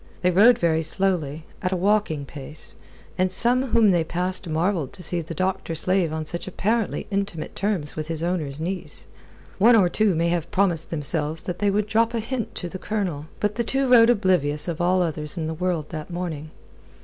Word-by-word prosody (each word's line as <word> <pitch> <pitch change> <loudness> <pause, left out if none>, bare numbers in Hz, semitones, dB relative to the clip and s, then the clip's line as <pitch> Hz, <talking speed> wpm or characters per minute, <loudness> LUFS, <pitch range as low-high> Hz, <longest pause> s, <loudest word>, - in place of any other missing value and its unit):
They 180 - +4
rode 220 +7 +6
very 160 -2 +1
slowly, 160 -3 -1 0.2
at 185 - -1
a - - +1
walking 185 -6 +1
pace, 145 +2 -8 0.5
and 185 0 +2
some 250 +6 +1
whom 225 -4 +4
they 175 -2 +2
passed 180 +2 -2
marvelled 160 -2 -1
to 190 -3 -5
see 175 +1 -1
the 165 +1 -7
doctor 185 -1 -2
slave 185 0 +3
on 160 0 -3
such 170 +3 -4
apparently 215 +4 -1
intimate 195 -5 -3
terms 195 -8 -2
with 155 -1 -4
his 165 -1 -4
owner's 155 -5 -2
niece. 180 +3 -5 0.5
One 230 +4 +7
or 190 -5 +4
two 210 -1 +2
may 170 +1 +1
have 170 -1 -1
promised 175 -4 +1
themselves 155 0 -1
that 180 -1 -5
they 205 - +2
would 205 +1 +1
drop 225 +2 +1
a - - 0
hint 235 0 -4
to 180 - -4
the 185 +2 -7
Colonel. 180 -9 -3
But 210 0 0
the 235 - +1
two 270 +3 0
rode 235 -2 +7
oblivious 180 -9 +3
of 170 -1 -3
all 180 +1 +3
others 155 -2 -2
in 160 - -2
the 160 - -3
world 170 -2 -2
that 155 -1 -6
morning. 170 -4 -5
180 Hz, 200 wpm, -24 LUFS, 160-200 Hz, 0.5 s, One